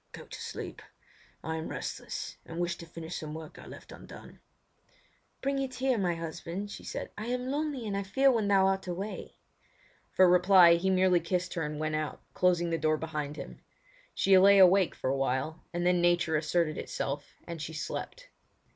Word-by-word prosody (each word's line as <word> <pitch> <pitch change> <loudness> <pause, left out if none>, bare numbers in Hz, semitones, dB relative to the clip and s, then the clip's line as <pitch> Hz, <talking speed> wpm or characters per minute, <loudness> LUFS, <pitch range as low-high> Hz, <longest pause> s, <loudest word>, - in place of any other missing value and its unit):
"Go - - -9
to - - -9
sleep. - - -6 0.6
I 160 0 -3
am 160 - -4
restless, - - -5
and 165 - -9
wish 175 0 -1
to 170 - -10
finish 165 +1 -7
some 155 0 -6
work 160 -1 -9
I - - -12
left - - -12
undone." - - -12 1.0
"Bring 275 0 0
it 265 -1 -3
here, 255 -3 +1
my 175 -3 0
husband," 170 +4 -6
she - - -9
said; - - -6
"I 215 - -5
am 250 +1 -2
lonely 290 -4 -2
and 205 -2 -2
I 200 - 0
fear 265 +8 +3
when 225 -4 +1
thou 195 -1 +4
art 195 0 0
away." 190 +4 -5 0.7
For 185 - +5
reply 180 -1 +7
he 170 +3 +1
merely 185 -1 +4
kissed 180 +1 -2
her 170 - -3
and 150 -1 -3
went 155 0 -2
out, 155 -1 -3
closing 175 -2 +2
the 165 - 0
door 155 0 +2
behind 150 -2 -4
him. - - -9 0.5
She 195 - +4
lay 200 +1 +7
awake 190 -1 +6
for 130 - -2
awhile, 135 +4 -1
and 175 0 -2
then 180 -1 +3
nature 175 -2 +2
asserted 155 0 0
itself, 140 +1 -4
and 170 -2 -6
she 160 - -5
slept. - - -6
175 Hz, 190 wpm, -30 LUFS, 160-195 Hz, 1.0 s, reply